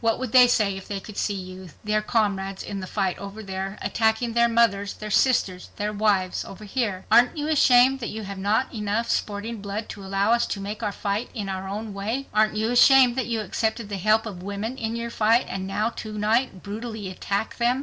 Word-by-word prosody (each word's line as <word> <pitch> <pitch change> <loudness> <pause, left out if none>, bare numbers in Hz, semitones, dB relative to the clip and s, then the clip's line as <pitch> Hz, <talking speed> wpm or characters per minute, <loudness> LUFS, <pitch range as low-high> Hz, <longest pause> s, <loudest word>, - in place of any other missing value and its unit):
What 225 -1 +2
would 255 -3 -4
they 250 -1 +8
say 210 -5 +2
if 195 - -9
they 200 -1 -3
could 210 +1 -11
see 205 - -1
you, 185 -1 -8
their 215 0 +1
comrades 200 -3 -1
in 200 - -5
the 185 - -6
fight 190 -3 -1
over 200 +2 -8
there, 195 +1 -5
attacking 225 +1 +1
their 235 0 +4
mothers, 205 -4 +2
their 215 0 -7
sisters, 195 -7 +2
their 210 0 -2
wives 200 -3 +1
over 210 +2 -10
here? 205 -4 -2
Aren't 245 +6 +5
you 295 0 -2
ashamed 265 -3 +5
that 230 - -4
you 220 0 -6
have 200 -1 -7
not 210 +8 0
enough 215 +1 -1
sporting 210 +1 -3
blood 205 +2 -5
to 205 - -8
allow 195 +2 +1
us 235 0 +3
to 200 - -3
make 205 +2 -5
our 210 -2 -1
fight 200 +3 -3
in 205 -4 -4
our 190 0 -4
own 210 +1 -5
way? 220 +7 -3
Aren't 215 0 +3
you 220 +2 0
ashamed 250 0 +6
that 260 -2 -1
you 230 -2 -1
accepted 220 +2 -2
the 200 - -3
help 215 +4 +2
of 195 -5 -7
women 200 +5 -4
in 225 -3 -3
your 235 0 -4
fight, 225 +2 +3
and 190 0 -4
now 210 +3 0
to 215 -1 -6
night 215 -1 0
brutally 220 0 -6
attack 200 +3 -3
them?" 245 +2 +2
215 Hz, 220 wpm, -24 LUFS, 200-230 Hz, -, they